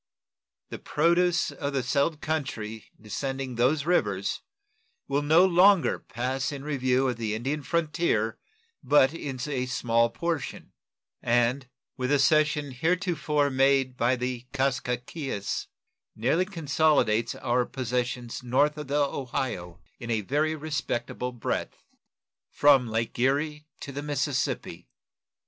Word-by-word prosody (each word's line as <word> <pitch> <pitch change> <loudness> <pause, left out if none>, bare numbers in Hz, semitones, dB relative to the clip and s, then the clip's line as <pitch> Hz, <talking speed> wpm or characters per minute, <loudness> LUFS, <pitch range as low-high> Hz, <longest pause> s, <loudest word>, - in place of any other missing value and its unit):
The - - -7
produce 170 +2 +2
of 140 -1 -4
the 135 -2 0
settled 145 +4 0
country 115 -8 -3
descending 135 +4 -4
those 135 +5 +1
rivers 100 - 0 0.7
will 140 +1 +1
no 160 +5 +5
longer 185 0 +4
pass 130 +4 -3
in 140 -1 -6
review 130 -3 +1
of 125 -2 -1
the 110 -2 -2
Indian 135 +7 -2
frontier 155 -9 0 0.4
but 140 -1 +4
in 140 -6 -5
a 130 -4 -2
small 115 -2 +2
portion, 165 +2 -4 0.5
and, 120 +2 +1 0.3
with 125 -1 -2
the 145 - +4
cession 150 0 +2
heretofore 155 -1 0
made 135 -1 +3
by 125 +1 +2
the 125 0 -4
Kaskaskias, 130 -3 -2 0.5
nearly 135 +11 +1
consolidates 150 - +1
our 125 +1 +1
possessions 125 -1 -3
north 145 +5 +1
of 150 - -6
the 145 +1 +2
Ohio, 120 -11 -4 0.2
in 120 - -7
a 110 -2 +1
very 150 +8 0
respectable 140 -5 -3
breadth 120 -2 -3 0.7
from 135 -5 +4
Lake 115 +1 -2
Erie 150 +4 0
to 140 - -6
the 140 +1 -5
Mississippi. 145 -2 -2
135 Hz, 120 wpm, -27 LUFS, 120-150 Hz, 0.7 s, no